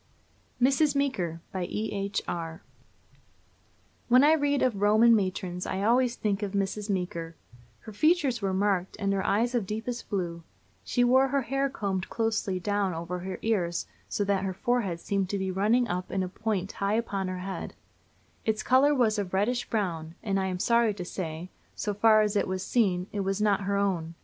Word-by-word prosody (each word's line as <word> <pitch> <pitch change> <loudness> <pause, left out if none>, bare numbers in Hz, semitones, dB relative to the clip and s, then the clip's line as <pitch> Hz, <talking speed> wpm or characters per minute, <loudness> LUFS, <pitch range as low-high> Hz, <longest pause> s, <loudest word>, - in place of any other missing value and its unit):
MRS. 275 +3 +3
MEEKER. 185 - -1
BY 185 -2 -2
E.H. 200 0 -2
ARR. 165 +1 -5 1.4
When 250 +2 +6
I 305 +2 +6
read 285 -2 +1
of 230 -6 0
Roman 220 +3 +6
matrons 185 -3 -2
I 190 - -2
always 245 +2 +3
think 205 -3 -1
of 205 -1 -3
Mrs. 200 +1 -2
Meeker. 170 -4 -3 0.5
Her 220 - -10
features 280 - +2
were 195 -1 0
marked, 190 -1 0
and 200 0 0
her 195 -1 0
eyes 230 +5 +1
of 230 -6 0
deepest 225 +3 -4
blue. 175 -4 -2 0.4
She 245 - +1
wore 260 +2 +5
her 275 0 0
hair 275 +3 0
combed 195 -7 -3
closely 220 -5 -1
down 200 -2 0
over 170 +2 -4
her 185 +1 -5
ears, 180 -6 0 0.2
so 205 - 0
that 200 -1 0
her 190 -1 -2
forehead 210 -5 0
seemed 195 0 -1
to 190 -2 -2
run 215 +6 +3
up 180 -2 -3
in 190 - -1
a - - -2
point 200 -1 -2
high 200 +1 -1
upon 200 -4 -1
her 185 0 -3
head: 190 +1 -5 0.7
Its 220 -1 0
color 275 +3 +4
was 220 -5 +2
of 190 -2 -3
reddish 240 +6 0
brown, 170 -7 -2
and, 195 -2 0
I 190 - 0
am 185 -1 -2
sorry 235 +2 +2
to 180 - -6
say, 170 -1 -5 0.2
so 205 - -2
far 215 +1 +5
as 210 0 -1
it 205 - +1
was 185 0 -3
seen, 185 -7 +1
it 205 - -3
was 195 0 -1
not 205 -2 +2
her 200 0 0
own. 175 -5 -1
200 Hz, 185 wpm, -28 LUFS, 185-230 Hz, 1.4 s, When